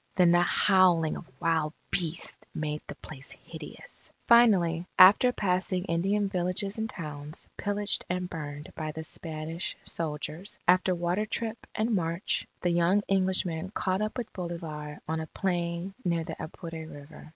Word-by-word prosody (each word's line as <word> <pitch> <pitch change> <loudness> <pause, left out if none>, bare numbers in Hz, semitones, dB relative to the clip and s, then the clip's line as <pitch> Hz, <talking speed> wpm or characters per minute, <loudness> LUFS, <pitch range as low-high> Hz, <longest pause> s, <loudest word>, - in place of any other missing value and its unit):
Then 180 -2 +6
the 175 0 +5
howling 175 -3 +4
of - - -8
wild 160 -2 +1 0.2
beasts 170 -2 -2
made 150 -1 -2
the - - -7
place 140 -2 -8
hideous. - - -11 0.2
Finally, 185 -8 +5
after 205 +7 +8
passing 185 -3 0
Indian 195 +5 +1
villages 195 +2 -1
and 220 0 -1
towns 150 -4 -6
pillaged 205 0 +1
and 180 0 -1
burned 150 -3 -7
by 155 -1 -4
the 160 +1 -6
Spanish 160 +1 -5
soldiers, 160 +3 -4
after 185 +1 +4
water 175 +5 0
trip 225 0 -4
and 220 +2 +1
march, 170 -1 0
the 175 - +2
young 175 +4 +3
Englishmen 185 -3 +1
caught 190 +1 0
up 215 +3 -2
with 240 -3 -5
Bolivar 160 -5 -5
on 160 +1 -1
a 160 - -4
plain 175 +1 -2
near 170 -3 +1
the - - -5
Apure 160 0 -7
River. 145 +1 -11
175 Hz, 150 wpm, -29 LUFS, 160-190 Hz, 0.2 s, after